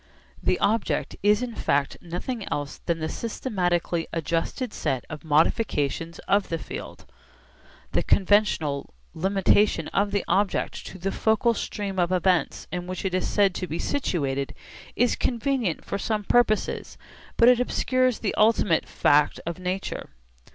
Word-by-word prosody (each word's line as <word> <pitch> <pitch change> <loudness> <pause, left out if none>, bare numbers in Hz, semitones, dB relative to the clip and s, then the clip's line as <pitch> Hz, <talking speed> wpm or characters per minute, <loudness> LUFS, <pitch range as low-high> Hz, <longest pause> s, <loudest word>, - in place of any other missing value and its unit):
The - - +1
object 220 +1 0
is 210 +4 +3
in 245 -2 -4
fact 140 -8 0
nothing 190 +6 -5
else 145 -1 -3
than 170 -1 +1
the 160 -1 -3
systematically 175 -7 -1
adjusted 165 - -2
set 130 -2 -2
of 155 - -7
modifications 160 - +1
of 200 0 +2
the 165 - -1
field. - - -8 0.9
The - - +2
conventional 175 - +2 0.2
limitation 195 +3 +2
of 200 +1 +1
the 200 0 -1
object 200 0 0
to - - -9
the 190 +2 -2
focal 220 +3 +2
stream 200 -3 -4
of 175 0 +2
events 180 -1 +1
in 180 0 -4
which 185 +1 -5
it 190 - -1
is 185 - 0
said 200 -3 +3
to 185 - -4
be 160 - -3
'situated' 140 - -1 0.4
is 245 +1 +2
convenient 240 - -1
for 200 - -3
some 215 0 -1
purposes, 215 0 +1 0.4
but 235 - +6
it 250 -1 +6
obscures 255 0 +1
the 215 - -2
ultimate 210 -6 +3
fact 145 0 +3
of 170 +2 -4
nature. 185 +1 -4
190 Hz, 145 wpm, -25 LUFS, 165-215 Hz, 0.9 s, but